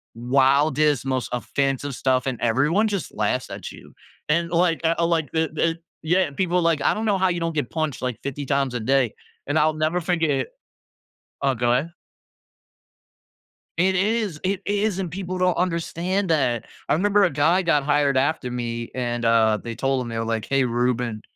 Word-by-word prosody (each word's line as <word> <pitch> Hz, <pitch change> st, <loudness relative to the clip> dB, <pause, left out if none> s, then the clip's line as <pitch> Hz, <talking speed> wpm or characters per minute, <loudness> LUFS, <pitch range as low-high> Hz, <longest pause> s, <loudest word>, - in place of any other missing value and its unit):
wildest, 140 Hz, +3 st, +2 dB
most 130 Hz, -4 st, -1 dB
offensive 135 Hz, +2 st, -1 dB
stuff, 130 Hz, +1 st, +1 dB
and 125 Hz, -3 st, -2 dB
everyone 150 Hz, -, +2 dB
just 200 Hz, -4 st, -3 dB
laughs 110 Hz, +4 st, -1 dB
at -, -, -7 dB
you," -, -, -14 dB, 0.4 s
and, 170 Hz, +2 st, +1 dB
like, 170 Hz, -1 st, +2 dB
I 165 Hz, +1 st, +1 dB
like 165 Hz, -4 st, 0 dB
the 160 Hz, 0 st, 0 dB
the 165 Hz, +1 st, 0 dB, 0.2 s
yeah 180 Hz, +1 st, +2 dB
people 180 Hz, +3 st, 0 dB
like, 165 Hz, -3 st, +1 dB
"I -, -, +3 dB
don't 220 Hz, +1 st, -3 dB
know 205 Hz, -3 st, +2 dB
how 190 Hz, 0 st, +2 dB
you 175 Hz, -, -1 dB
don't 165 Hz, -1 st, -2 dB
get 145 Hz, -5 st, -1 dB
punched, 155 Hz, -5 st, -2 dB
like, 125 Hz, -3 st, -3 dB
50 140 Hz, +1 st, -4 dB
times 135 Hz, -2 st, 0 dB
a 120 Hz, -, -1 dB
day," 130 Hz, -1 st, +2 dB, 0.3 s
and 145 Hz, +2 st, 0 dB
I'll 155 Hz, +1 st, +3 dB
never 155 Hz, +3 st, 0 dB
forget 160 Hz, -4 st, 0 dB, 1.0 s
Oh, 135 Hz, -1 st, +3 dB
go 120 Hz, 0 st, +1 dB
ahead. 150 Hz, +7 st, 0 dB, 1.9 s
It 185 Hz, +2 st, +3 dB
is! 205 Hz, -3 st, 0 dB
It 190 Hz, 0 st, 0 dB
is, 205 Hz, -1 st, 0 dB
and 180 Hz, -4 st, -3 dB
people 185 Hz, 0 st, -4 dB
don't 180 Hz, -1 st, +2 dB
understand 180 Hz, +2 st, -1 dB
that. 130 Hz, -7 st, +1 dB, 0.2 s
I -, -, +2 dB
remember 205 Hz, +5 st, +3 dB
a 180 Hz, -, +2 dB
guy 160 Hz, +6 st, +2 dB
got 150 Hz, -4 st, +2 dB
hired 145 Hz, -2 st, +2 dB
after 135 Hz, -2 st, 0 dB
me, 120 Hz, -1 st, -4 dB
and, 120 Hz, -2 st, -2 dB
uh, 110 Hz, -2 st, +4 dB
they 115 Hz, -1 st, -5 dB
told 135 Hz, +2 st, 0 dB
him, 120 Hz, -, -6 dB
they 115 Hz, -1 st, -4 dB
were 115 Hz, -, -1 dB
like, 115 Hz, -1 st, -2 dB
"Hey, 135 Hz, -1 st, +2 dB
Ruben" 120 Hz, -2 st, -1 dB
150 Hz, 185 wpm, -23 LUFS, 125-175 Hz, 1.9 s, uh